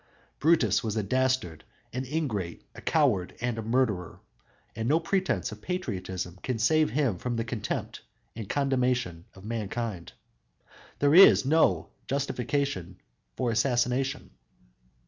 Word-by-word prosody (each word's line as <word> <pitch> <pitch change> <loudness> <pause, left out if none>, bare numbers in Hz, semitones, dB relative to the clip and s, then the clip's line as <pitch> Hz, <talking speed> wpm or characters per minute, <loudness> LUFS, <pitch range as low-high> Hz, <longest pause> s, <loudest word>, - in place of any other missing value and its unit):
Brutus 160 -3 +3
was 110 -2 -2
a 110 - 0
dastard, 130 -8 0 0.3
an 130 +2 -3
ingrate, 120 - -3
a - - -11
coward 90 -3 +1
and 120 -1 -2
a - - -2
murderer, 110 -6 0 0.6
and 115 +2 -2
no 155 +3 +4
pretense 190 +3 -1
of - - -10
patriotism 95 - -4
can 130 -3 -2
save 155 +8 +3
him 120 -6 0
from 120 +3 -2
the 115 - -1
contempt 115 -3 -4 0.3
and 110 -3 -7
condemnation 125 -10 0
of 95 +1 -13
mankind. 110 -3 -4 0.8
There 145 0 +3
is 180 -6 +8
no 135 - +3 0.2
justification 130 - -2 0.4
for 125 -2 0
assassination! 125 +3 0
120 Hz, 125 wpm, -28 LUFS, 100-135 Hz, 0.8 s, is